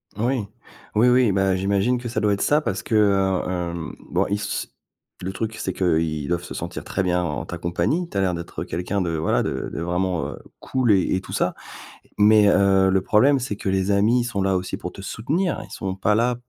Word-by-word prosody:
Moui. 120 0 0 0.5
Oui, 120 +3 +5
oui, 125 -4 +4
bah, 95 -1 +2
j'imagine 100 +6 +1
que 120 - -6
ça - - -1
doit 105 -1 +2
être 100 - -2
ça, 150 +1 +3
parce - - -2
que, 110 - -2
heu, 95 -3 +2
hem, 85 -2 -4
bon, - - +1
ils 100 0 0
se 100 -1 -3 0.6
le 95 +1 -3
truc, 110 +2 -3
c'est 95 - -3
qu'ils 80 -4 0
doivent 85 0 -1
se - - -8
sentir - - -5
très 95 - -2
bien 90 -1 +1
en 75 -4 -3
ta 85 - -6
compagnie, 85 - -1
tu - - -16
as - - +2
l'air 90 -2 +1
d'être 85 0 -6
quelqu'un 95 +3 -2
de, 85 -2 -1
voilà, 80 - +1
de - - -3
de - - -4
vraiment, 90 0 -1
heu, - - -8 0.2
cool 130 -4 +1
et 95 -2 +3
et 95 - -1
tout - - -10
ça, - - 0 0.6
mais, 105 0 +6
heu, 95 -1 +4
le 95 0 +2
problème, 135 +6 +4
c'est 120 -5 -3
que 100 - -3
les 95 +1 +1
amis 110 +5 +3
sont 110 -5 -2
là 95 0 +1
aussi 90 +1 -4
pour 90 - -6
te 95 - -10
soutenir, 160 - -1
ils - - -15
sont 95 -1 -4
pas 105 +2 +1
là 120 +2 +2
95 Hz, 230 wpm, -23 LUFS, 90-110 Hz, 0.6 s, mais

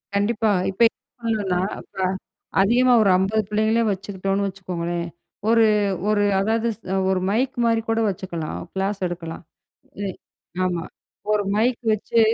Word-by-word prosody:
கண்டிப்பா, 215 +1 +2 0.2
இப்ப 195 - -7
என்ன - - -64
பண்ணலாம்னா, 205 -6 0 0.4
ப - - -15 0.6
அதிகமா 245 +5 +4
ஒரு 200 - +4
50 205 +4 +1
பிள்ளைகள 220 +2 +2
வச்சுக்கிட்டோம்னு 195 0 -2
வச்சுக்கோங்களேன். 175 -3 -3 0.4
ஒரு, 230 -1 +6 0.4
ஒரு 205 -1 +3 0.2
அதாவது 225 +3 +1 0.4
ஒரு 190 -1 +2
மைக் 250 +6 0
மாரி 230 -1 +3
கூட 225 0 +2
வச்சுக்கலாம் 170 -4 -4
கிளாஸ் 195 +1 -1
எடுக்கலாம். 170 -1 -6 0.6
அ - - -1 0.6
ஆமா, 175 -2 -1 0.5
ஒரு 210 -1 +2
மைக் 235 +2 +2
வச்சு 220 +2 +1
200 Hz, 125 wpm, -23 LUFS, 185-225 Hz, 0.6 s, ஒரு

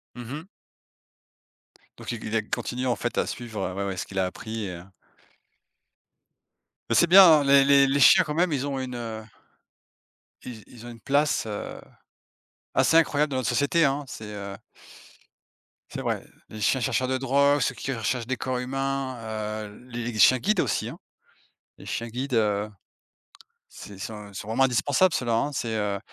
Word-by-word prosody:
Mmh 120 0 -8
mh. 155 +4 -7 1.5
Donc - - -6
il 115 - -6
il 110 - -3
a 110 - +2
continué 125 +4 -4
en 120 - +1
fait 120 - -4
à - - +2
suivre, 105 -6 -5
ouais, 100 0 -2
ouais, 95 -2 -4
ce - - -3
qu'il 95 -1 -5
a 95 - +2
appris 110 +3 -5
et 90 - -5
heu 85 +1 -9 2.0
mais - - +1
c'est 170 - +5
bien, 190 +3 +9 0.2
hein, - - 0
les 140 0 +6
les 140 -1 +5
les 140 +1 +1
chiens 185 +7 +7
quand 150 -1 -5
même, 175 0 +2
ils 140 +1 -1
ont 135 -1 -3
une, 130 -1 -5
heu 110 -2 -6 1.2
ils 115 -4 -9
ils 120 -1 -13
ont - - -8
une 115 -1 -11
place, 145 +5 +1
heu, 105 -2 -6 0.9
assez 165 - +4
incroyable 150 -2 +2
dans 130 - -1
notre 130 - -1
société, 150 +3 +2
hein. 140 +1 0
C'est, 110 -4 -8
heu 100 -1 -7 1.3
c'est - - -6
vrai. - - -2 0.2
Les 110 -1 -9
chiens 130 +4 +2
chercheurs 130 0 0
de 130 0 0
drogue, 140 +2 +3
ceux - - 0
qui 135 - -4
recherchent 115 +1 -2
des 130 -1 -2
corps 130 -1 -2
humains, 135 0 -3 0.5
heu, 105 - -14
les 120 -2 -5
chiens 130 +3 +6
guides 210 - +1
aussi, 115 - 0
hein. - - -9 0.8
Les - - -13
chiens 115 - -3
guides, 125 +3 -4
heu, 105 -1 +1 1.0
c'est 105 - -11
ils 95 - -13
sont 105 -1 -7
ils 100 - -16
sont 100 - -7
vraiment 125 +4 +2
indispensables 140 - +2
ceux 125 - -1
là, 115 - +1
hein, 140 +6 0
c'est, 115 -3 -3
heu, 100 -1 -1
125 Hz, 190 wpm, -25 LUFS, 110-140 Hz, 2.0 s, bien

